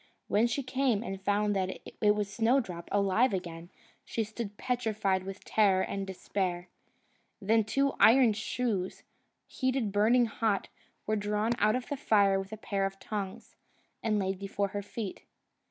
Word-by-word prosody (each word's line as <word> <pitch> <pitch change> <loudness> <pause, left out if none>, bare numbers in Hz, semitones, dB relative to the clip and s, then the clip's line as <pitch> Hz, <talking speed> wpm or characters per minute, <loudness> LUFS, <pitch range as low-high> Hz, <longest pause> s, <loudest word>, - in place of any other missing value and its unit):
When 220 +3 +3
she 255 +4 -2
came, 255 -4 0
and 195 -4 -5
found 205 +1 +1
that 185 -1 -2 0.2
it 210 -1 +5
was 210 -1 -1
Snowdrop 225 -7 0
alive 205 +3 +3
again, 170 -2 -6 0.3
she 225 - -2
stood 215 -1 -6
petrified 215 -6 0
with 195 +1 -8
terror 195 -3 +3
and 195 0 -3
despair. 180 -2 -3 0.7
Then 220 +3 +3
two 275 +6 +1
iron 240 -1 +6
shoes, 215 -3 -2 0.4
heated 255 -5 -1
burning 225 +5 +4
hot, 220 -3 -1 0.4
were 215 - +1
drawn 210 +2 0
out 215 +2 +3
of 255 -1 -3
the 285 - -3
fire 200 -7 +3
with 195 +1 -7
a 220 - -6
pair 195 -2 -1
of 195 0 -9
tongs, 200 -2 -6 0.5
and 215 -2 +1
laid 190 -1 -1
before 200 0 -2
her 205 +1 -3
feet. 205 0 -6
210 Hz, 155 wpm, -30 LUFS, 195-230 Hz, 0.7 s, iron